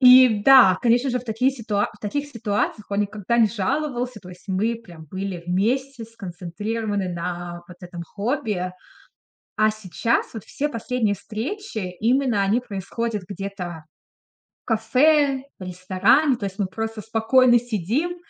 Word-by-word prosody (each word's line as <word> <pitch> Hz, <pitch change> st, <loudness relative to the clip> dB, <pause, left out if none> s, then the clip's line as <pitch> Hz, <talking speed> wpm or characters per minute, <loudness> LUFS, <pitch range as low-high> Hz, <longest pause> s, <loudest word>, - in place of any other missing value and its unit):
И 250 Hz, -4 st, +8 dB
да, 255 Hz, -9 st, +8 dB
конечно 245 Hz, +3 st, +3 dB
же, 250 Hz, 0 st, 0 dB
в 245 Hz, -, -14 dB
такие 230 Hz, +4 st, +1 dB
ситуа 215 Hz, -5 st, -1 dB
в 210 Hz, -, -18 dB
таких 285 Hz, +8 st, -3 dB
ситуациях 215 Hz, -4 st, -2 dB
он 200 Hz, 0 st, +1 dB
никогда 210 Hz, +3 st, -1 dB
не 225 Hz, -2 st, +5 dB
жаловался. 250 Hz, +2 st, -2 dB
То 180 Hz, -, -13 dB
есть 180 Hz, +2 st, -14 dB
мы 210 Hz, +5 st, +1 dB
прям 175 Hz, -9 st, -12 dB
были 190 Hz, +1 st, -5 dB
вместе 235 Hz, +7 st, 0 dB
сконцентрированы 205 Hz, 0 st, -4 dB
на 175 Hz, 0 st, -5 dB
вот 180 Hz, -, -12 dB
этом 175 Hz, -1 st, -8 dB
хобби. 205 Hz, -, -2 dB, 0.9 s
А 215 Hz, 0 st, +5 dB
сейчас 215 Hz, +2 st, -1 dB
вот 220 Hz, -, -6 dB
все 295 Hz, +1 st, -2 dB
последние 230 Hz, -4 st, -1 dB
встречи, 230 Hz, -, -5 dB, 0.2 s
именно 240 Hz, -2 st, +2 dB
они 205 Hz, +5 st, +2 dB
происходят 220 Hz, -1 st, -4 dB
где-то 195 Hz, -5 st, -6 dB, 0.8 s
в -, -, -
кафе, 265 Hz, +5 st, +3 dB, 0.2 s
в 185 Hz, -, -7 dB
ресторане. 190 Hz, -, +2 dB
То 210 Hz, -, -6 dB
есть 195 Hz, +1 st, -7 dB
мы 195 Hz, -, +2 dB
просто 225 Hz, +3 st, -4 dB
спокойно 235 Hz, +3 st, +4 dB
сидим, 245 Hz, -, -2 dB
220 Hz, 150 wpm, -23 LUFS, 190-250 Hz, 0.9 s, И